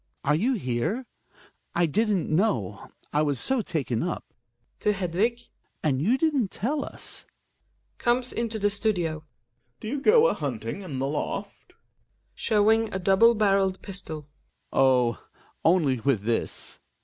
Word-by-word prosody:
Are 145 - +2
you 220 - +2
here? 130 - -2 0.7
I 175 - +3
didn't 205 +3 +1
know 120 - 0
— - - -32
I 150 - +3
was 145 -4 0
so 265 -2 +1
taken 145 - -2
up 175 +1 -3 0.3
— 120 0 -46
{To 210 - +2
Hedvig.) 200 +6 0 0.4
And 135 -3 +1
you 230 - +3
didn't 280 -9 +1
tell 280 +10 -2
us - - -6 0.8
Gomes 245 +1 +1
into 230 -1 -1
the 205 -1 +1
studio. 180 -7 0
Gregers. 155 -1 -26 0.5
Do - - -6
you 280 +2 -2
go 455 - +6
a - - +4
hunting 120 - -4
in 160 -9 -6
the 135 +1 -1
loft? 145 +1 -4
Hjalmar - - -44
{showing 220 +1 +2
a - - -1
double 195 +5 +5
barreled 195 -3 +2
pistol). 180 -6 -6 0.5
Oh! 125 -4 +3 0.4
only 160 -7 +3
with 120 -5 +1
this. 115 +1 -2
185 Hz, 150 wpm, -26 LUFS, 140-225 Hz, 0.8 s, go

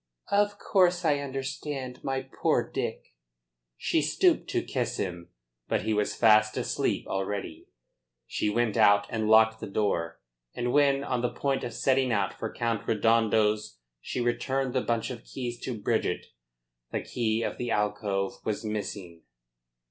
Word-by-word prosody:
"Of 205 0 +2
course 180 -3 +2
I 145 -2 +3
understand, 135 -1 -5
my 135 0 -1
poor 135 - 0
Dick." - - -4 0.6
She - - +1
stooped - - +2
to - - 0
kiss - - -2
him. 85 -2 -4 0.4
But - - 0
he 110 0 0
was 105 -1 0
fast 110 -1 +5
asleep - - -1
already. 95 -4 -4 0.6
She 105 - -1
went 110 0 0
out 100 0 +5
and 110 -1 -1
locked 110 0 +6
the - - -6
door, 95 -5 -1 0.4
and 120 0 -1
when, 140 -1 +4
on 125 -3 -1
the 125 - +1
point 135 -1 -1
of 120 - -3
setting 130 -1 +2
out 100 -4 +1
for 115 - -5
Count 115 -2 -2
Redondo's, 110 - +2 0.2
she - - -4
returned 130 +2 0
the 130 - +1
bunch 115 0 -1
of 120 -1 -8
keys 120 -2 -5
to 120 -4 -4
Bridget - - 0 0.7
the - - -1
key 115 -2 -1
of - - -3
the 120 - -2
alcove 105 -2 -1
was 110 +1 -3
missing. 100 -5 -5
115 Hz, 155 wpm, -28 LUFS, 105-130 Hz, 0.7 s, locked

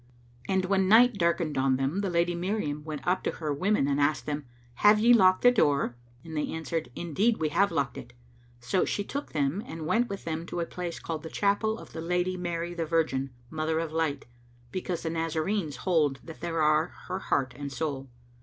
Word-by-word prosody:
'" 120 +1 -22
And 190 -1 +2
when 190 0 +2
night 240 +3 +7
darkened 170 -4 +1
on 130 0 +3
them 135 +9 -1
the 200 - -1
Lady 175 0 +1
Miriam 170 -5 -2
went 155 -2 -6
up 180 +1 +2
to - - -1
her 155 -3 -3
women 185 0 +1
and 140 0 +1
asked 150 +2 +1
them, 150 -1 -3 0.3
"Have 210 +1 +6
ye 235 +3 +6
locked 185 -5 +5
the 245 - +8
door?"; 145 - +2 0.3
and 160 -1 -8
they 150 - 0
answered, 160 0 -3
"Indeed 195 +8 +1
we 155 -1 0
have 200 +7 +2
locked 135 -3 -1
it." - - -12 0.5
So 125 +10 +1
she 205 - -1
took 285 +7 -5
them 150 +5 0
and 160 -1 -7
went 235 +9 +2
with 200 - -5
them 165 +1 -3
to 175 - -4
a 170 - 0
place 175 0 -5
called 160 -2 -4
the 160 - -7
Chapel 210 +4 +1
of - - -12
the 160 - -5
Lady 180 +2 0
Mary 175 -1 -3
the 165 -2 -3
Virgin, 155 -5 +1 0.2
Mother 160 0 -1
of 165 -1 -2
Light, 155 -3 -1 0.5
because 180 -2 -3
the 160 - -2
Nazarenes 165 +1 -1
hold 150 -7 +1
that 160 - -11
there 165 -2 0
are 155 +2 +4 0.2
her 185 +1 -3
heart 130 -8 0
and 145 -1 -6
soul. 135 -2 -3
165 Hz, 210 wpm, -28 LUFS, 150-185 Hz, 0.5 s, the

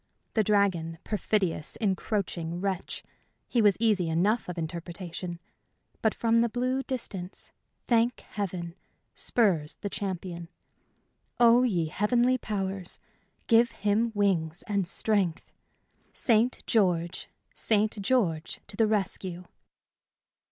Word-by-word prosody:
The 220 - +3
dragon 185 -6 +1
perfidious, 195 -6 0
encroaching 190 -5 -1
wretch! 190 -1 -3 0.4
he 240 - +2
was 205 -3 +5
easy 210 -7 +2
enough 195 +7 +1
of 180 - -5
interpretation. 170 +1 -5 0.6
But 220 - +2
from 230 0 +3
the 235 - +2
blue 255 +3 0
distance, 200 -9 -5 0.4
thank 235 +1 +2
Heaven! 180 -4 -4 0.4
spurs 180 -11 +1
the 200 - -3
champion. 175 -3 -4 0.9
Oh, 240 0 +7
ye 190 -10 +1
heavenly 240 +9 +2
powers, 195 -4 -3 0.5
give 235 0 +5
him 210 +3 +1
wings 175 -5 +1
and 200 -3 -1
strength! 195 -4 0 0.6
"St. 235 +1 +2
George 180 -6 +1 0.2
St. 215 -1 +1
George 195 -9 0
to - - -7
the 225 +1 +3
rescue!" 190 -4 -2
200 Hz, 110 wpm, -28 LUFS, 175-225 Hz, 0.9 s, Oh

